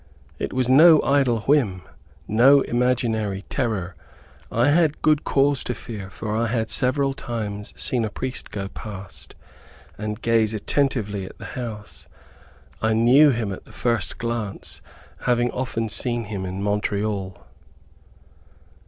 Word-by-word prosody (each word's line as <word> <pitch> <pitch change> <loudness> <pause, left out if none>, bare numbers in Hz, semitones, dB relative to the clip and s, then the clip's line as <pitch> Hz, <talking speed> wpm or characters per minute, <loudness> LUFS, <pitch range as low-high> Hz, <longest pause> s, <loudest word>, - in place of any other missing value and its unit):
It - - -3
was 130 -1 0
no 155 +5 +8
idle 135 -5 +2
whim, 110 -10 +1 0.4
no 130 +6 +6
imaginary 115 -6 0
terror. 95 -8 -2 0.6
I 120 +5 +3
had 155 0 +2
good 155 -1 +3
cause 140 -1 +2
to 125 - -2
fear, 105 -3 -8
for 105 +3 -4
I 115 +1 +1
had 115 -1 -1
several 135 +1 +1
times 105 -6 -5
seen 125 -3 +1
a 110 - -1
priest 130 +5 -5
go 100 -2 -4
past, 100 -1 -9 0.6
and 105 0 -4
gaze 115 -2 +2
attentively 105 -4 -1
at - - -13
the - - -9
house. 110 -4 -7 0.7
I 110 0 +2
knew 125 +7 +6
him 115 -6 -1
at - - -10
the - - -16
first 120 -2 -1
glance, 115 -4 -4 0.4
having 120 0 +2
often 125 -3 -2
seen 120 +2 -1
him 100 -3 -5
in 95 +2 -4
Montreal. 100 -2 -1
115 Hz, 135 wpm, -23 LUFS, 105-130 Hz, 0.7 s, no